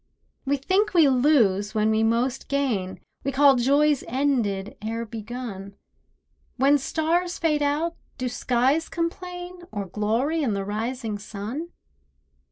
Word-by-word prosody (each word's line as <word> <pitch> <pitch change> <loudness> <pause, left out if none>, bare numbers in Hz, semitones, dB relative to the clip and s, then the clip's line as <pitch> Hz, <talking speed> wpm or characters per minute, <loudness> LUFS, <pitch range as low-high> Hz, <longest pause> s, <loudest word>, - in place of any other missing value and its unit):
We 285 +1 +1
think 375 +9 +1
we 325 -4 +7
lose 235 -7 +3
when 215 0 +2
we 220 0 +2
most 235 +4 0
gain; 235 -10 -1 0.2
We 275 - -1
call 275 0 +6
joys 285 +3 +3
ended 230 -7 0
ere 225 +2 -3
begun; 220 -3 -7 0.8
When 280 +3 +4
stars 340 +5 0
fade 305 -3 +1
out 295 +4 0 0.2
do 255 - -2
skies 255 +6 +1
complain, 355 +1 -4
Or 205 -2 -3
glory 225 - 0
in 245 -8 0
the 195 0 -3
rising 220 +1 -3
sun? 220 +11 -6
255 Hz, 130 wpm, -25 LUFS, 220-300 Hz, 0.8 s, we